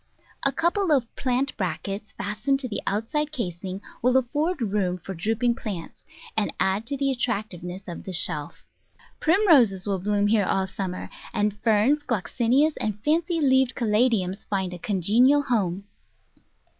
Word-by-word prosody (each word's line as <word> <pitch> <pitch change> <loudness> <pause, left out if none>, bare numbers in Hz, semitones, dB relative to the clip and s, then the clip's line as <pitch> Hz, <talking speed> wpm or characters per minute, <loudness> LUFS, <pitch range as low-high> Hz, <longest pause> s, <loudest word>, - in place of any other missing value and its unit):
A 275 - +2
couple 345 +5 +1
of 255 -6 +1
plant 260 +1 0
brackets 195 +3 -3
fastened 215 +7 -1
to 255 - -3
the 215 - -4
outside 290 +9 -1
casing 190 - -5 0.2
will 250 +2 +4
afford 295 +7 0
room 195 -5 0
for 185 +2 -7
drooping 225 +7 0
plants, 200 -8 -7 0.3
and 215 -2 0
add 195 +4 +1
to 280 - -2
the 275 0 +1
attractiveness 200 -6 -3
of 175 - -7
the 190 - -6
shelf. 150 -4 -2 0.5
Primroses 300 - +4
will 200 -2 -1
bloom 205 +2 +1
here 205 -1 +3
all 190 0 +1
summer, 185 -1 -5 0.2
and 210 -1 +1
Ferns, 230 +6 +3
Gloxinias, 250 - +1
and 210 -1 -2
fancy 330 +3 +1
leaved 265 -3 +3
Caladiums 215 -4 +1
find 190 -3 -1
a 175 - -7
congenial 225 - +3
home. 200 -8 0
215 Hz, 145 wpm, -25 LUFS, 195-265 Hz, 0.5 s, will